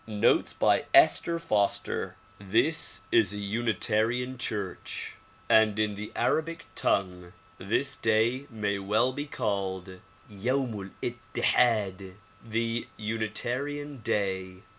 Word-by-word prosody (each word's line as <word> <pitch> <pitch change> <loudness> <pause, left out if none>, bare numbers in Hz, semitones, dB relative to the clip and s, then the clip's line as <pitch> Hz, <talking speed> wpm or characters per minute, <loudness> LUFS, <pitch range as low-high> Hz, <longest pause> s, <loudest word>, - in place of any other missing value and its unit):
Notes 105 -2 +2
by - - +2
Esther 170 0 +5
Foster 105 -11 -1 0.2
THIS 105 +4 +1
is 110 -3 +4
a - - -5
unitarian 115 +3 0
church, 100 -6 -4 0.3
and 110 -2 +5
in 105 -1 +1
the 105 +1 -7
Arabic 165 +1 0
tongue, 90 -2 -1 0.3
this - - 0
Day 115 +5 +1
may 105 -3 -2
well 110 +6 +1
be 145 +2 -4
called 95 -6 -3 0.3
"Yauml'ittihad," 105 -3 -1 0.3
the 115 +1 -2
"Unitarian 120 +7 -2
Day." 95 -3 -2
110 Hz, 95 wpm, -28 LUFS, 100-120 Hz, 0.3 s, Esther